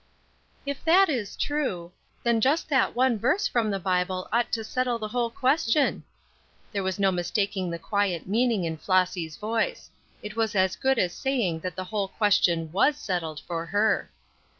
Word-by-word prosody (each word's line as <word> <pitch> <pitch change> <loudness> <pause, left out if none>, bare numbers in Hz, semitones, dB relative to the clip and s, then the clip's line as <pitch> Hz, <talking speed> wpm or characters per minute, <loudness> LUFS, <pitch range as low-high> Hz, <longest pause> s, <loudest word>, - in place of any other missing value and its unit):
"If 280 -1 -4
that 370 +3 +6
is 235 -9 -2
true, 200 - -2 0.3
then 235 -2 +2
just 295 +7 +2
that 270 -3 +2
one 250 -3 +2
verse 365 - +2
from 230 -3 0
the 200 - 0
Bible 185 0 -1
ought 235 0 +1
to 225 - 0
settle 250 +2 -1
the 215 -2 -5
whole 240 +1 0
question." 265 +2 +1 0.7
There 200 - -2
was 190 -1 -2
no 195 -1 +3
mistaking 190 +1 -1
the 170 - -3
quiet 195 -1 -1
meaning 225 -1 +1
in 160 -1 -3
Flossy's 180 -3 0
voice; 230 - -2 0.3
it 210 +1 -7
was 225 -2 0
as 190 0 +2
good 265 +3 +1
as 180 -5 +1
saying 240 - -1
that 180 +1 -5
the 185 - -4
whole 200 +1 -2
question 180 -6 +2
was 275 - +3
settled 170 - -3
for 165 0 -5
her. 205 +5 +1
210 Hz, 175 wpm, -26 LUFS, 185-245 Hz, 0.7 s, that